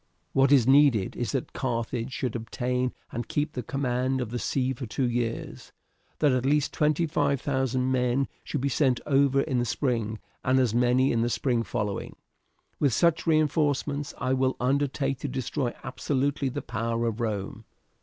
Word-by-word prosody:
What 135 +1 +4
is 135 -5 +6
needed 135 -7 +4
is 120 - -2
that 135 - -3
Carthage 120 -1 -2
should 130 -4 -3
obtain 125 +2 -1 0.2
and 120 0 -4
keep 150 +1 -1
the 125 - -3
command 130 0 -1
of 120 -3 -3
the 120 - -2
sea 130 +1 0
for 130 -1 -6
two 125 +3 -1
years, 120 -1 -3 0.5
that 150 -2 +3
at 130 -1 +1
least 145 +1 +1
twenty 150 +2 +2
five 140 -3 +1
thousand 130 -2 0
men 125 +1 +1 0.2
should 145 - -3
be 140 - +1
sent 130 -2 +2
over 140 -1 +3
in 130 -4 0
the - - +1
spring, 115 -3 -1 0.3
and 130 +1 +3
as 125 -4 +2
many 125 +2 +3
in 115 - +1
the 120 - +1
spring 120 -1 0
following. 105 -3 -3 0.6
With 140 -5 +2
such 170 +2 +2
reinforcements 145 -2 +1
I 130 +1 0
will 130 0 +1
undertake 135 +1 0
to - - -3
destroy 130 -1 -2
absolutely 135 +1 -1
the - - -5
power 115 +1 -2
of 115 0 -2
Rome. 105 -1 -3
130 Hz, 175 wpm, -27 LUFS, 120-140 Hz, 0.6 s, is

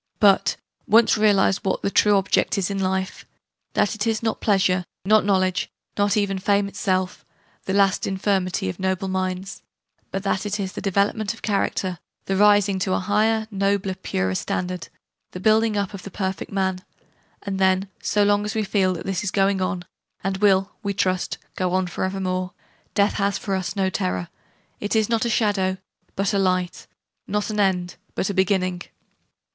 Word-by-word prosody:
But, 200 -2 +4 0.3
once 225 +2 +5
realise 205 -3 +3
what 195 - -2
the 200 - 0
true 205 0 +4
object 195 +2 +1
is 195 0 0
in 195 - -2
life 190 0 -2 0.5
that 205 - +2
it 215 0 -2
is 225 0 0
not 225 -1 -1
pleasure, 185 -3 +2 0.2
not 215 +2 +5
knowledge, 185 -2 +1 0.3
not 205 0 +2
even 195 -2 0
fame 200 +1 +2
itself, 185 -2 -1 0.4
'that 190 - -1
last 195 -1 +3
infirmity 190 - 0
of 95 - -4
noble 190 0 -1
minds' 185 +1 -3 0.5
but 195 - -4
that 195 -1 0
it 205 0 -2
is 190 -1 -3
the - - -6
development 200 +2 0
of - - -18
character, 195 -3 -1 0.3
the 195 - -1
rising 205 -1 +4
to 185 0 0
a - - +1
higher, 215 +3 +1
nobler, 195 -1 0
purer 95 - -2
standard, 180 - -3 0.4
the 180 - -6
building 215 +2 +3
up 200 0 -1
of 195 - -7
the 200 - -8
perfect 190 0 -4
Man 190 -2 0 0.6
and 195 -1 -3
then, 190 +1 +3
so 210 - +2
long 205 0 +3
as 210 +1 -4
we 220 - +1
feel 190 -2 +1
that 170 - -7
this 195 -1 -2
is 205 - -1
going 195 0 +1
on, 185 -1 -2 0.4
and 195 0 -1
will 195 -1 +3
(we 200 -2 -2
trust) 185 -2 0 0.2
go 180 -1 -1
on 185 0 +2
for 180 - -4
evermore, 185 -1 -2 0.4
death 200 0 +3
has 200 0 +1
for 195 0 -4
us 185 -1 -2
no 195 -1 +1
terror; 90 - -2 0.5
it 205 +2 -2
is 220 -1 +2
not 230 0 +1
a - - 0
shadow, 200 -4 +1 0.4
but 200 +2 0
a 200 - +2
light; 185 -2 0 0.4
not 210 +1 -1
an 210 - -2
end, 180 -3 +1 0.2
but 195 - 0
a - - -4
beginning! 185 -2 +1
195 Hz, 185 wpm, -23 LUFS, 185-205 Hz, 0.6 s, once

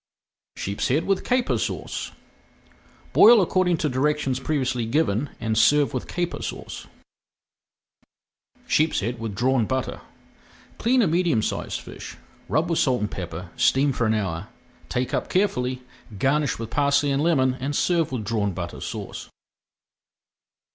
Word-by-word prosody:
SHEEPSHEAD 125 - -1
WITH 195 -1 0
CAPER 250 -1 +1
SAUCE - - -4 1.0
Boil 230 +1 +8
according 185 -2 +2
to 155 - 0
directions 135 0 0
previously 130 -4 -1
given 135 -1 +1
and 110 -1 -1
serve 145 +5 +4
with 130 - -3
Caper 175 -1 -3
Sauce. - - -6 1.8
SHEEPSHEAD 125 - +1
WITH 110 -3 -4
DRAWN 125 0 +2
BUTTER 130 0 -2 0.8
Clean 245 +2 +3
a - - +3
medium 165 -9 +2
sized - - -3
fish, - - -10 0.3
rub 155 +3 +1
with 165 - +1
salt 125 -4 +2
and 105 - -2
pepper, 90 -1 -6
steam 140 +1 +3
for 115 -2 0
an 110 - +2
hour, 95 -3 -3 0.4
take 125 0 -2
up - - -1
carefully, 130 -10 0 0.3
garnish 140 +4 +1
with 115 -1 -6
parsley 140 0 +2
and 140 +1 +1
lemon, 135 -6 +3
and 140 +3 -3
serve 170 -3 +1
with 120 -5 -3
Drawn 100 -2 0
Butter 85 -1 -6
Sauce. - - -6
130 Hz, 135 wpm, -24 LUFS, 115-155 Hz, 1.8 s, Boil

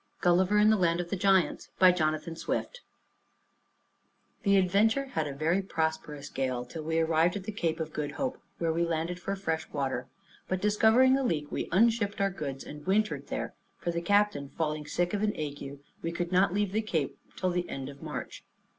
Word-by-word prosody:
GULLIVER 185 +3 +4
IN 210 +1 +6
THE 220 - +4
LAND 170 -2 +2
OF 175 -1 -4
THE - - +1
GIANTS 190 -1 +2
By 185 -1 +7
Jonathan 155 -1 -1
Swift - - -3 1.6
The 200 -1 +4
Adventure 205 +8 +3
had 160 -2 0
a - - -4
very 165 +6 +1
prosperous 160 -5 -2
gale, 130 -2 -2
till 155 +6 -7
we 160 +1 -1
arrived 165 +2 +3
at 200 - -4
the 215 - -4
Cape 170 -6 -1
of 160 -1 -4
Good 145 -1 -3
Hope, 265 -1 -3 0.2
where 165 -1 0
we 170 +1 +1
landed 170 +1 -1
for 195 +2 -3
fresh 160 -5 -2
water; 130 -3 -2 0.4
but 185 - -1
discovering 220 +6 +5
a - - 0
leak, 150 - -1
we - - -3
unshipped 210 +1 +3
our 195 0 +2
goods, 140 -7 -5
and 150 +2 -10
wintered 215 +3 +1
there; - - -4 0.2
for 170 - -2
the 170 0 -2
captain 200 -6 +2
falling 150 -2 -1
sick 175 +3 0
of 205 - 0
an 210 0 +1
ague, 145 -2 -5 0.2
we 165 - -2
could 170 +1 -3
not 185 0 +4
leave 205 0 0
the 215 +2 +1
Cape 165 -10 -2 0.2
till 185 -1 0
the 175 0 -2
end 135 -1 -5
of 140 0 -10
March. - - -6
175 Hz, 200 wpm, -29 LUFS, 155-200 Hz, 1.6 s, By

